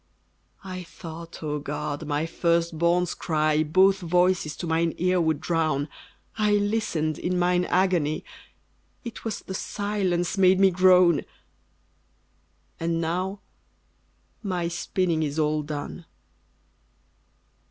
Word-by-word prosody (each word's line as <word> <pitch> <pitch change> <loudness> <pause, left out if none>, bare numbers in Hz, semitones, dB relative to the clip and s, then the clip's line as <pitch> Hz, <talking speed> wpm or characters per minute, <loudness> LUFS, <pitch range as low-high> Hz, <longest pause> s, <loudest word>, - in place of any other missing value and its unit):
I 185 -1 -6
thought, 165 -1 -10
O 150 -1 -2
God! 150 +1 -4
my 150 +1 0
first 170 0 0
born's 175 +1 +2
cry 155 -1 +1
Both 190 +5 +4
voices 180 -3 +1
to - - -4
mine 165 0 0
ear 180 +1 +2
would 160 -3 +1
drown: 155 -4 0 0.5
I 210 -1 +3
listened 205 -7 0
in 180 +1 -1
mine 180 0 +2
agony, 175 -5 +1 0.8
It 235 -3 -8
was 220 -3 -4
the 190 - -7
silence 195 -3 -1
made 185 0 +5
me 195 -1 +6
groan! 180 -3 +5 1.6
And 165 0 -1
now 185 +4 -2 1.0
my 180 -5 -2
spinning 175 -1 -1
is 150 -1 -2
all 155 -1 +1
done. 150 +3 -6
170 Hz, 115 wpm, -25 LUFS, 155-185 Hz, 1.6 s, me